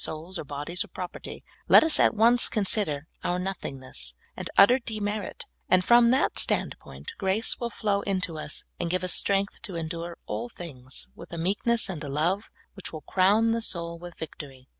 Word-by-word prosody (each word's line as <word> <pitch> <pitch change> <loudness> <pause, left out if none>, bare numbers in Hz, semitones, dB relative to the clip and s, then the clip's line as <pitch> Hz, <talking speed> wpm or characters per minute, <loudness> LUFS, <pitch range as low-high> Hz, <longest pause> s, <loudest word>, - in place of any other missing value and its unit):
souls 165 +3 -3
or - - -4
bodies 145 +5 -3
or - - -13
propert}^ 180 -1 -8 0.2
let - - +9
us 320 -1 +6
at - - +4
once 235 +3 +5
consider 195 -9 0 0.2
our 175 - 0
nothingness 130 - -5 0.2
and - - -5
utter 240 +7 +7
de 220 -3 -6
merit, 205 0 -4 0.2
and, 185 -1 +4
from 240 0 +6
that 260 +3 +2
standpoint, 465 - -1
grace 195 +4 +1
will 235 - -2
flow 205 -2 -1
into 185 -4 -2
us, 155 0 -3 0.2
and 175 - -2
give 185 +1 0
us 185 - +2
strength 200 0 0
to 200 -6 -7
endure 165 +1 -5
all 240 - -4
things 130 - -8
with - - -12
a 170 - -5
meekness 205 +7 +1
and 170 -6 -5
a 145 - -5
love 170 +9 0 0.2
which 195 - -9
will 155 - -7
crown 205 +8 +3
the 230 0 0
soul 170 -5 -1
with 175 0 -10
victory. 135 -5 -9
185 Hz, 185 wpm, -27 LUFS, 160-210 Hz, 0.2 s, let